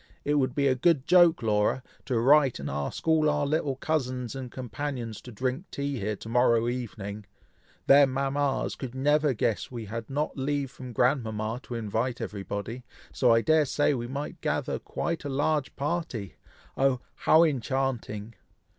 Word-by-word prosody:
It 145 - +1
would 130 -2 0
be 140 - +1
a 135 - +4
good 140 +1 +2
joke, 175 -5 +5
Laura, 105 +3 +1 0.2
to 125 -4 0
write 135 +1 +5
and 70 - -5
ask 70 - -4
all 155 -1 +4
our 150 -1 +1
little 145 -2 0
cousins 130 -5 -2
and 130 -2 -6
companions 125 -2 -5
to 125 - -10
drink 130 - -2
tea 140 -2 -3
here 105 +1 -2
to 105 - -11
morrow 115 -1 +3
evening! 105 -4 -5 0.6
Their 140 0 +7
mamas 135 +1 0
could 130 -2 -7
never 145 +1 +2
guess 110 0 -1
we 120 -3 -6
had 115 +2 -6
not 145 +3 -2
leave 140 0 -1
from 125 -1 -9
grandmama 115 -3 0
to 120 - -6
invite 115 +2 -2
everybody, 105 +4 -5 0.3
so 125 -3 +3
I 115 0 +5
dare 155 +3 +4
say 145 +2 +2
we 120 -3 -3
might 140 +4 -5
gather - - -1
quite 170 -1 -3
a 145 - -4
large 145 +1 0
party! 140 - -3 0.4
oh! 135 -2 +2
how 160 +2 +5
enchanting!" 130 -6 -1
130 Hz, 165 wpm, -28 LUFS, 115-145 Hz, 0.6 s, Their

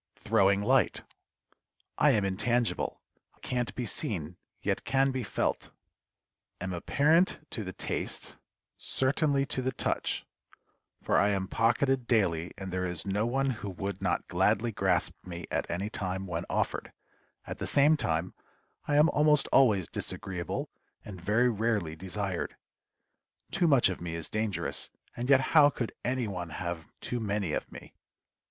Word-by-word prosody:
THROWING 100 +1 +3
LIGHT. 130 +4 +2 1.0
I - - +6
am 105 -3 +3
intangible; 115 +5 0 0.4
can't 125 -1 -2
be 125 - -2
seen, 90 -6 -3 0.3
yet - - 0
can 135 0 +2
be 130 -1 -2
felt; 110 - -1 0.9
am 90 +1 -3
apparent 155 - +2
to 110 - -3
the 95 - -5
taste - - -3 0.4
certainly 140 +1 +1
to 130 - -2
the 130 +1 0
touch, - - -1 0.8
for - - +3
I 100 - +4
am 95 -2 0
pocketed 120 +4 +1
daily, 85 -8 +2
and 95 -2 -6
there 90 0 0
is 90 -2 -4
no 100 +3 0
one 135 +2 +1
who 110 -4 -5
would 95 +1 -5
not - - 0
gladly 120 0 +2
grasp 95 -4 +1
me 85 -1 -7
at - - -1
any 95 +5 -2
time 95 -1 -3
when 85 -1 -3
offered; - - -1 0.5
at - - -6
the - - -2
same 145 +3 +5
time, 85 - -1 0.5
I 145 - +1
am 150 +2 +6
almost 150 -1 +3
always 105 -10 +4
disagreeable, 90 -2 -4 0.3
and 95 -4 -8
very 110 +7 +3
rarely 105 -7 0
desired. 95 +1 -3 1.0
Too 175 -3 +2
much 140 -6 +5
of 90 - -4
me 85 -1 -4
is 85 -2 -4
dangerous, 110 -2 -2 0.3
and 120 +2 -4
yet 135 -1 +7
how 150 -3 +8
could 125 -4 -4
any 125 -1 0
one 90 -4 -4
have 85 0 -5
too 120 - -3
many 100 -6 -1
of - - -3
me? - - -11
105 Hz, 150 wpm, -30 LUFS, 90-130 Hz, 1.0 s, how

